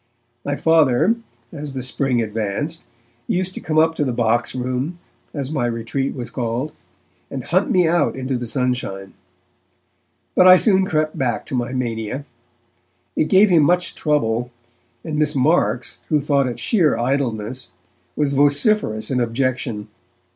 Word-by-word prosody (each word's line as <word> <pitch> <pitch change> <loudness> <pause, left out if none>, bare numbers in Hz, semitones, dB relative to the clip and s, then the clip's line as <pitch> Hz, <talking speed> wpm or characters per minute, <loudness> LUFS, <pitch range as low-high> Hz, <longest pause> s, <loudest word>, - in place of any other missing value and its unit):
My 145 - -2
Father, 160 - +3 0.4
as 150 -3 -7
the 130 -2 -4
spring 125 -1 +1
advanced, 110 - -3 0.4
used 185 +1 -1
to - - -6
come 155 -1 -2
up 160 +1 +4
to 155 - -1
the 130 - -1
Boxroom, 125 +6 -1 0.3
as 140 -2 -4
my 135 -6 0
retreat 120 +4 -2
was 125 -3 -6
called, 125 +4 -2 0.6
and 135 -2 -5
hunt 185 +8 +1
me 180 -3 +3
out 170 +1 +2
into 130 0 -3
the 120 -1 -4
sunshine. 120 -6 -2 1.2
But 185 - +5
I 185 - +10
soon 190 0 +4
crept 155 -2 -1
back 125 -4 -1
to - - -4
my 120 0 -2
mania. 120 +1 -3 0.9
It - - +2
gave 195 +1 +5
him 165 -3 +6
much 180 +4 +2
trouble, 120 -6 0 0.5
and 150 -2 -3
Miss 150 -1 +1
Marks, 125 -5 +1
who 150 - +3
thought 140 -2 +1
it 120 - -4
sheer 175 -10 +2
idleness, 125 -1 -2 0.4
was 145 -2 0
vociferous 145 - +2
in 130 - +1
objection. 120 -3 -2
135 Hz, 145 wpm, -20 LUFS, 120-155 Hz, 1.2 s, I